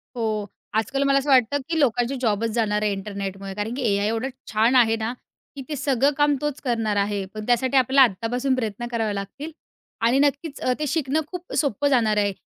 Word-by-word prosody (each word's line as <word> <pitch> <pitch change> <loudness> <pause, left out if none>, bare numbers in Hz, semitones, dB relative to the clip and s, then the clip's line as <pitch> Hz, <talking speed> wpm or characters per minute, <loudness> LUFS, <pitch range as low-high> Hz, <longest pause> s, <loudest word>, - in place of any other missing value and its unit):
हो, 215 -3 -1 0.3
आजकाल 255 +5 0
मला 275 0 +3
असं 285 +1 -4
वाटतं 265 +2 +4
की 325 -1 0
लोकांची 245 -1 +1
जॉबच 225 -1 +1
जाणार 210 -2 +1
आहे 210 - +1
इंटरनेटमुळे. 195 -1 -5
कारण 210 +4 -3
की 265 - -4
एआय 200 +1 +1
एवढं 225 +4 -1 0.2
छान 225 +4 +3
आहे 225 -3 +5
ना, 225 +1 -3 0.4
की 275 - -6
ते 300 - -2
सगळं 275 0 +2
काम 290 -1 +3
तोच 295 -1 -2
करणार 225 -5 0
आहे. 200 0 0
पण 215 0 -6
त्यासाठी 255 +2 +2
आपल्याला 265 +2 +5
आत्तापासून 245 +6 -1
प्रयत्न 240 -1 -3
करावे 225 -3 -1
लागतील 240 +11 -6 0.5
आणि 255 +4 +3
नक्कीच 285 +1 0
अ, 255 - +1
ते 300 - -1
शिकणं 310 0 0
खूप 360 -1 -7
सोपं 285 -1 +1
जाणार 225 -6 +2
आहे. 205 -1 +2
240 Hz, 195 wpm, -23 LUFS, 215-275 Hz, 0.5 s, आहे